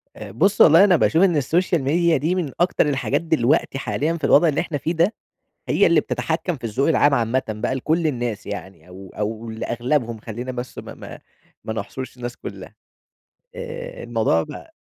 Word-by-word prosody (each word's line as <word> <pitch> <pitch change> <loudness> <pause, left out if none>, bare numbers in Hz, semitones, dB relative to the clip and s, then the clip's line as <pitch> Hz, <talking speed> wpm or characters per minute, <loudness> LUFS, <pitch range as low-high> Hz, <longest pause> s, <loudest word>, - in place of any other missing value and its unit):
آآ، - - -9
بُصّ 195 - +2
والله 165 +4 +8
أنا 195 -3 +5
باشوف 165 +2 +3
إن 175 -5 +3
السوشيال 165 +2 +1
ميديا 165 +4 +2
دي 170 +5 0
من 165 -7 -2
أكتر 175 -2 +2
الحاجات 135 +3 0
دلوقتي 150 -4 +1
حاليًا 155 +3 -1
في 155 - -16
الوضع 145 +4 +5
اللي 150 - +1
إحنا 160 -4 -3
فيه 160 +4 -2
ده، 170 +6 +2 0.5
هي - - +3
اللي - - +4
بتتحكم 175 -3 -2
في - - -23
الذوق 120 +6 0
العام 145 -2 +4
عامةً 120 0 +1
بقى, 110 +4 -2
لكُلّ 160 +5 0
الناس 120 -6 -3
يعني 95 -2 -8
أو 95 +1 -12
أو 110 +2 -3
لأغلبهم 120 +2 -2
خلّينا 120 +4 -6
بس 125 0 -7
ما - - -8
ما - - -10 0.4
ما 110 - -4
نحصرش 125 +5 -6
الناس 120 0 -6
كلّها، - - -9 0.8
آآ، - - -7
الموضوع - - +1
بقى 325 - -10
140 Hz, 180 wpm, -22 LUFS, 120-170 Hz, 0.8 s, والله